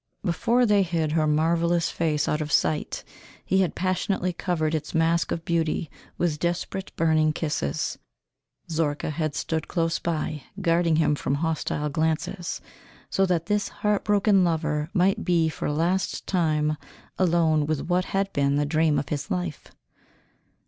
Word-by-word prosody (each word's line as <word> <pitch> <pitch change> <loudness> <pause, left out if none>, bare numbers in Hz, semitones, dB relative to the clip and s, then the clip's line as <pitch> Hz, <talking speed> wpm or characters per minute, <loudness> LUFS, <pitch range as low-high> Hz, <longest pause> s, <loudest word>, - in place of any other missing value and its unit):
Before 230 +7 +2
they 205 -3 +4
hid 165 -4 0
her 155 -1 +2
marvellous 165 +2 +2
face 155 -3 0
out 150 - 0
of 150 0 -4
sight 150 +2 +1 0.4
he 190 0 +3
had 185 - 0
passionately 185 0 0
covered 165 -3 -1
its 155 0 -3
mask 165 +1 +2
of 165 - -3
beauty 165 -1 0 0.3
with 160 -4 0
desperate 175 +3 -2
burning 155 -1 +3
kisses. 150 - -2 0.7
Zorka 155 -2 -1
had 155 -1 -2
stood 160 -1 -2
close 165 -1 0
by, 155 -2 -2 0.2
guarding 170 -2 +2
him 155 -1 +3
from 140 -1 -1
hostile 150 -1 -1
glances, 160 +3 -2 0.5
so 195 0 +2
that 170 -2 0
this 205 +2 0
heartbroken 205 -1 +2
lover 155 -3 0
might 190 0 +2
be 170 -3 +2
for - - -4
a - - 0
last 175 +5 0
time 155 -4 +1 0.4
alone 165 -4 +3
with 155 -2 0
what 180 +1 +1
had 195 0 -1
been 140 0 +2
the 145 0 +1
dream 155 0 +2
of 140 -1 -2
his 145 -1 -3
life. 90 -3 -3
165 Hz, 150 wpm, -25 LUFS, 155-175 Hz, 0.7 s, they